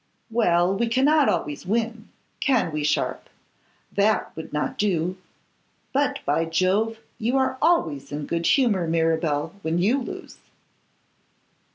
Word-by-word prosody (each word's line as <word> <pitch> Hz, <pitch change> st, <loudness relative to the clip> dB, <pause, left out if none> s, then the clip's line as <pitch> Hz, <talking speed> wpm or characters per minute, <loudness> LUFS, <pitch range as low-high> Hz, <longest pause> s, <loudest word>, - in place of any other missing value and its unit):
'Well, 180 Hz, -5 st, +3 dB
we 235 Hz, +4 st, 0 dB
cannot 275 Hz, +5 st, +3 dB
always 145 Hz, -1 st, -2 dB
win. 225 Hz, +2 st, -2 dB, 0.3 s
Can 255 Hz, -11 st, +2 dB
we, 150 Hz, -1 st, -2 dB
Sharpe? 150 Hz, -, -1 dB, 0.6 s
That 210 Hz, +2 st, +1 dB
would 160 Hz, -, -8 dB
not 150 Hz, 0 st, -2 dB
do. 180 Hz, -3 st, 0 dB, 0.8 s
But, 280 Hz, 0 st, +1 dB
by 155 Hz, +3 st, +1 dB
Jove! 185 Hz, +7 st, +1 dB, 0.2 s
you 240 Hz, +4 st, +1 dB
are 260 Hz, 0 st, 0 dB
always 160 Hz, -, +1 dB
in 145 Hz, 0 st, -4 dB
good 170 Hz, +2 st, -1 dB
humour, 210 Hz, -, +3 dB
Mirabel, 160 Hz, -1 st, 0 dB
when 160 Hz, -1 st, -1 dB
you 225 Hz, +10 st, +2 dB
lose. -, -, -8 dB
190 Hz, 130 wpm, -24 LUFS, 165-235 Hz, 0.8 s, Well